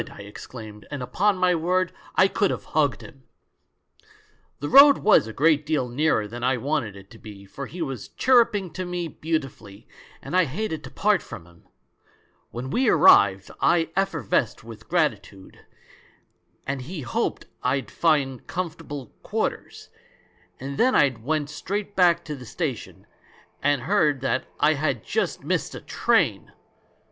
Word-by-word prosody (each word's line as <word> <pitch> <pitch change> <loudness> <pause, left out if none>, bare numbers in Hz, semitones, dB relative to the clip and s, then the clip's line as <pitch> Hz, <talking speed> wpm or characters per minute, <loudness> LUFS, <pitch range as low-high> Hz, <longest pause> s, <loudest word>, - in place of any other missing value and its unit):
I - - -11
exclaimed, 105 +1 -11
and 145 -3 -5
upon 200 +9 +1
my 185 -1 +3
word 180 +2 0 0.2
I 190 - +5
could 200 0 +1
have - - -3
hugged 145 -3 +1
him! 135 - -14 1.4
"The 145 - -4
road 280 - +8
was 210 - +4
a - - -6
great 150 +5 +2
deal 150 -4 -1
nearer 120 -4 +1
than 120 +3 -8
I 130 0 +2
wanted 130 -5 -2
it 100 +1 -14
to 115 - -14
be, 100 -2 -12
for 135 +8 -8
he 175 0 -5
was 135 -7 -6
chirruping 220 - +2
to 185 - -4
me 175 -1 -3
beautifully, 135 -11 -5 0.3
and - - -6
I 185 -2 +5
hated 160 +2 -4
to - - -9
part 205 -4 +1
from 105 -8 -10
him. 85 -1 -22 0.8
When 125 +3 -6
we 255 -1 +2
arrived 100 - +5
I 165 -2 +2
effervesced 165 - 0
with 110 -1 -12
gratitude, 110 - -2 1.1
and 135 -1 -3
he 155 +5 -7
hoped 120 -2 -2 0.2
I'd 130 +2 -1
find 140 -6 0
comfortable 155 -7 -6
quarters; - - -4 0.7
and 135 +1 -6
then 255 +2 +4
I 140 - +5
went 145 +5 -3
straight 200 +6 -4
back 175 -2 +3
to 150 - -5
the 125 -3 -11
station - - -5 0.3
— - - -31
and 145 -2 +1
heard 155 -9 +2
that 130 0 -1
I 155 +1 +4
had 140 -6 -2
just - - -2
missed - - -2
a - - -6
train! - - 0
145 Hz, 155 wpm, -24 LUFS, 120-175 Hz, 1.4 s, road